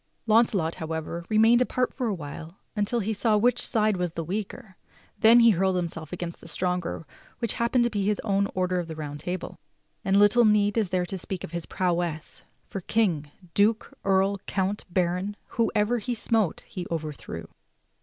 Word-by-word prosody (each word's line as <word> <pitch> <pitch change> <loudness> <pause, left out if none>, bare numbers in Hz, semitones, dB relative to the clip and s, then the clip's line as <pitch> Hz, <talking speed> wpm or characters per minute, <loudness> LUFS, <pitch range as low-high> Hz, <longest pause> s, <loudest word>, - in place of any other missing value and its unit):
Launcelot, 215 -7 +3
however, 160 +1 -4
remained 225 +3 +5
apart 250 0 0
for 255 -3 -2
a 215 - 0
while 160 +2 -8 0.2
until 215 +3 0
he 220 +2 -1
saw 215 +1 +2
which 245 +4 +3
side 215 -4 +2
was 180 -1 -1
the 165 -1 -4
w^eaker, 195 +2 -5 0.5
then 230 +2 +7
he 230 -1 +7
hurled 190 0 +1
himself 165 -3 -4
against 175 -1 -5
the - - -12
stronger 180 -1 -2 0.3
which 230 -3 -1
happened 240 +1 +3
to 240 - +2
be 205 -2 -1
his 205 +1 +1
own 200 -1 +1
order 185 -1 +1
of 175 - -4
the 160 - -6
Round 145 -2 -6
Table. 180 +4 -5 0.4
And 195 +1 +2
little 205 +4 +6
need 210 -2 +3
is 220 -5 +1
there 180 -1 0
to 190 +1 -4
speak 185 0 -5
of - - -7
his 170 -1 -2
prowess, 170 -3 -2 0.2
for 195 - -6
king, 175 -8 0 0.2
duke, 215 +2 +2
earl, 195 +1 +2
count, 195 +1 -1
baron 180 +3 0
— - - -42
whoever 225 +1 +2
he 240 +3 -3
smote 220 -5 0
he 180 -2 -7
overthrew. 155 -3 -5
195 Hz, 185 wpm, -26 LUFS, 175-215 Hz, 0.5 s, then